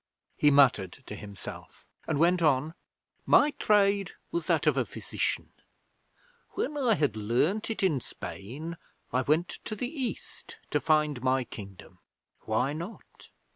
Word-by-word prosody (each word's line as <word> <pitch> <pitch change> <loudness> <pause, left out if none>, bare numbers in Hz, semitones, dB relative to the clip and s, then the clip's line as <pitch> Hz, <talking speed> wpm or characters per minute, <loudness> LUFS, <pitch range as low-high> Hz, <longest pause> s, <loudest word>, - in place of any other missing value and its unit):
He 150 - +4
muttered 125 -10 +4
to 105 - -7
himself 100 -1 -10 0.2
and 155 - 0
went 175 +3 +4
on: 150 0 +2 0.5
'My 295 +1 +6
trade 200 -6 +2 0.2
was 340 0 -2
that - - +2
of - - +4
a - - +2
physician. - - -3 1.0
When 295 - -2
I 250 -6 +3
had 145 - +1
learned 125 - 0
it 220 - -2
in 160 -8 +3
Spain 150 +16 -7 0.4
I 130 - +3
went 155 +6 +2
to 215 - -4
the 230 - -3
East 270 -6 -5
to - - +2
find 150 -4 +2
my 130 0 +2
Kingdom. 100 -5 -11 0.5
Why 125 +6 +1
not? 170 +8 -9
150 Hz, 140 wpm, -29 LUFS, 125-195 Hz, 1.0 s, My